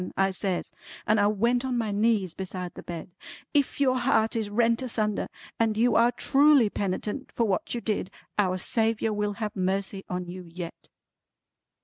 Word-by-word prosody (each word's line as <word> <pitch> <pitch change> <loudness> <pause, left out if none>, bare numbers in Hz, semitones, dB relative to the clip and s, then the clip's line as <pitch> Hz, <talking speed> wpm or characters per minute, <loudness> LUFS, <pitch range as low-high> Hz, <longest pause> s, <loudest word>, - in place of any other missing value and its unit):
I 195 0 +3
says, 185 -1 -2 0.3
and 215 0 +3
I 205 - +4
went 235 +4 +2
on 255 -2 -1
my 225 -3 -1
knees 205 -4 +1
beside 185 -1 -5
the - - -9
bed; 170 +1 -7 0.4
"if 285 -1 +1
your 255 -2 +3
heart 225 -3 +2
is 220 -2 -1
rent 230 +2 +2
asunder 215 -5 -1 0.3
and 220 -2 +2
you 235 +1 +3
are 235 +1 +5
truly 275 -2 +4
penitent 205 +6 -3
for 235 - 0
what 195 +2 -1
you 235 - -3
did, 210 -4 -1 0.3
Our 185 -3 +2
Saviour 225 +3 +1
will 210 0 -1
have 210 0 -4
mercy 195 +1 -1
on 180 0 -3
you 180 +1 -7
yet!" 170 -1 -8
210 Hz, 170 wpm, -27 LUFS, 190-235 Hz, 0.4 s, are